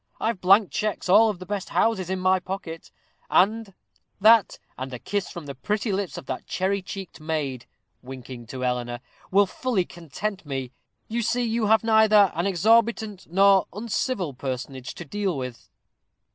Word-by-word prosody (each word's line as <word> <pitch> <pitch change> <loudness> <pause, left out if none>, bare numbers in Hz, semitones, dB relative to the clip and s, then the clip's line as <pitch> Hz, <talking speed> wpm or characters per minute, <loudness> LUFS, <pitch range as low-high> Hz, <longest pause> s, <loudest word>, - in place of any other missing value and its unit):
I've 225 -4 -1
blank 195 -1 +5
checks 210 +5 -2
of - - +5
all 220 +1 +6
the 185 -2 -9
best 200 0 -4
houses 195 -6 +1
in 190 0 -1
my 185 0 +3
pocket; 180 -3 -7 0.4
that 215 +1 +2 0.2
and 130 0 -6
a - - -5
kiss 200 +9 -3
from 170 -3 -8
the 140 - -6
pretty 210 - -2
lips 195 -1 -2
of - - -8
that 130 - -5
cherry 195 +1 -1
cheeked 190 -1 -8
maid," 150 -6 -3 0.3
winking 125 -2 -9
to 130 +2 -4
Eleanor, 120 -1 -2 0.3
"will 200 +2 +5
fully 200 -1 -1
content 185 +5 -5
me. 135 -4 -4 0.4
You 235 +2 -2
see 240 +2 0
you 230 -1 0
have 220 +1 +4
neither 220 -3 +5
an 170 +4 -1
exorbitant 220 +1 +2
nor 195 +1 +5
uncivil 205 - -2
personage 130 0 -5
to 175 - -8
deal 195 +1 -2
with." 125 -2 -7
190 Hz, 160 wpm, -25 LUFS, 145-215 Hz, 0.4 s, all